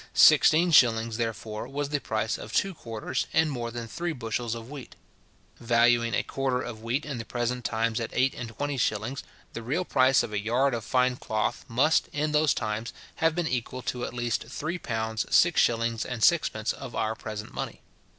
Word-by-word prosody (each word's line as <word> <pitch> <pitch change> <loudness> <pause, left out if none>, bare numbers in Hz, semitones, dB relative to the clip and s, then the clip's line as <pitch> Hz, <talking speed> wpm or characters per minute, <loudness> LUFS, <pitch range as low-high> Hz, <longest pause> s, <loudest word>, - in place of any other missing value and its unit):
Sixteen 155 +4 +6
shillings, 115 -5 +4
therefore, 110 -1 -4
was 140 +1 -3
the 145 0 0
price 110 0 -2
of - - -8
two 195 -1 +1
quarters 115 -2 -4
and 160 -1 +3
more 120 -3 -3
than 115 0 -6
three 170 +7 -3
bushels 115 -2 -3
of 115 0 -8
wheat. 140 -2 -9 0.6
Valuing 120 0 +3
a - - +1
quarter 135 -2 -1
of 120 -3 -6
wheat 120 +6 -2
in 140 -5 -4
the - - -4
present 120 +1 -2
times 115 0 0
at 115 - -3
eight 130 +1 +2
and 115 - -6
twenty 145 +5 -3
shillings, 115 +2 -1 0.3
the 115 - -5
real 145 +11 -1
price 130 -3 +4
of 105 - -6
a 105 - 0
yard 120 +6 +1
of 115 -2 -3
fine 125 0 +1
cloth 110 -3 -2
must, 135 +7 +2
in 150 +1 0
those 150 0 +3
times, 110 +2 -3 0.2
have 160 0 +2
been 175 -2 0
equal 130 -1 -3
to 125 -1 -3
at - - -5
least 120 -2 -1
three 155 +7 -4
pounds 110 -3 -2
six - - +5
shillings 115 -1 +1
and 125 -3 -4
sixpence 115 -10 +2
of 130 -3 -9
our 110 - 0
present 110 -1 -7
money. - - -5
120 Hz, 195 wpm, -27 LUFS, 115-140 Hz, 0.6 s, Sixteen